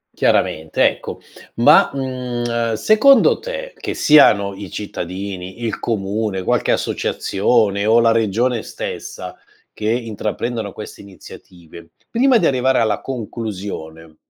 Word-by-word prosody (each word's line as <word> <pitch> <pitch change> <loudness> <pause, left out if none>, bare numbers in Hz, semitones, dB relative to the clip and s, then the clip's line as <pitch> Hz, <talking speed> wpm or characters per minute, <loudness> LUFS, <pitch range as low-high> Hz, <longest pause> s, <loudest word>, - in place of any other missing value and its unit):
Chiaramente, 80 0 +1
ecco. - - -5 0.4
Ma, - - +5
mhmm, 120 -3 -2
secondo 220 - +5
te, - - -6
che - - -5
siano 100 -10 +5
i 100 -1 -8
cittadini, 95 0 -6
il 110 - -2
comune, 105 -2 -2
qualche - - 0
associazione 100 0 0
o 115 +2 +5
la 115 -1 +4
regione 115 +2 0
stessa, 90 -1 -7 0.4
che 105 - -3
intraprendono 115 -1 -3
queste 105 - -10
iniziative, 85 -3 -14 0.2
prima 250 +1 +3
di 185 - +1
arrivare 130 0 +2
alla 110 -3 0
conclusione, 100 -10 -7
110 Hz, 115 wpm, -19 LUFS, 95-125 Hz, 0.4 s, Ma